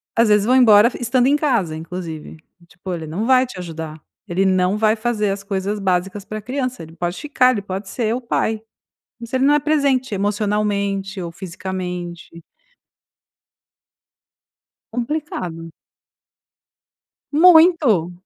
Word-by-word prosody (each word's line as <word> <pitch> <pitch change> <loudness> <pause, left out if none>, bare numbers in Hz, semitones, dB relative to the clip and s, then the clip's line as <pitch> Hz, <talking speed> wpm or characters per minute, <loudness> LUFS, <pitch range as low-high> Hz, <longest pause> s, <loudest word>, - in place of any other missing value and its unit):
às 230 -1 +3
vezes 210 -1 +4
vão 255 +3 +3
embora 225 -3 +7
e - - -12
estando 245 +1 +2
em 285 - +4
casa, 240 - 0
inclusive, 165 -1 -7 0.3
tipo 180 +1 -7
ele 165 -2 -5
não 180 +8 -3
vai 260 +1 +4
te 250 - -11
ajudar, 160 -3 -7 0.3
ele 185 +3 0
não 185 +1 +2
vai 215 0 +3
fazer 220 -2 -1
as 195 0 -5
coisas 200 +1 -3
básicas 190 +1 -1
para 215 0 -6
criança. 255 -2 -3
Ele 160 +1 -13
pode 175 +1 -3
ficar, 270 -4 +3
ele 220 -5 -2
pode 195 0 -6
ser 225 -1 -1
o 255 - -4
pai, 225 -2 -1 0.6
mas 235 -1 -9
ele 260 +1 +2
não 290 - +5
é 295 - +4
presente 275 -5 +1
emocionalmente 200 -1 -1
ou 170 -1 -5
fisicamente. 180 -2 -6 2.5
Complicado. 230 - -4 1.6
Muito. 315 - +5
205 Hz, 140 wpm, -20 LUFS, 180-250 Hz, 2.5 s, embora